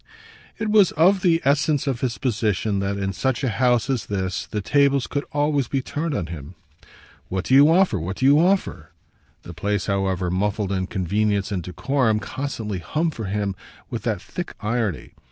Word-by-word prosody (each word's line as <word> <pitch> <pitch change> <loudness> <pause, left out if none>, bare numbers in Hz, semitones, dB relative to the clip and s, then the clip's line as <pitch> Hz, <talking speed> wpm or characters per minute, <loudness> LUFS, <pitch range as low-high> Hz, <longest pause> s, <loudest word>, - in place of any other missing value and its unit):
It 220 - -2
was 210 -4 +6
of 185 +4 +4
the 170 -3 +2
essence 145 +1 +2
of 130 -4 -2
his 125 -2 -1
position 110 -5 0
that 100 +1 -2
in 95 -1 -2
such 130 +7 -1
a 130 - +1
house 120 +1 +2
as 130 -6 -1
this 95 -3 -3
the 105 - -3
tables 140 +4 +2
could 145 0 -3
always 145 -2 +1
be 135 -2 -1
turned 150 +2 -3
on 85 - -2
him. 80 0 -8 0.7
"What 95 0 -2
do - - 0
you 140 +3 +8
offer, 175 - +3
what 90 +5 -4
do 130 - 0
you 145 +2 +6
offer?" 190 +3 +1 0.5
the 85 - -9
place, 100 +3 -1
however 95 -3 -1
muffled 100 +1 -1
in 95 -1 -1
convenience 100 +2 0
and 95 -3 -1
decorum, 110 - 0
constantly 110 -4 -4
hummed 155 - -1
for 110 - -5
him 100 0 -1 0.4
with - - -3
that - - -1
thick - - -7
irony. 105 -5 -2
110 Hz, 185 wpm, -23 LUFS, 95-140 Hz, 0.7 s, you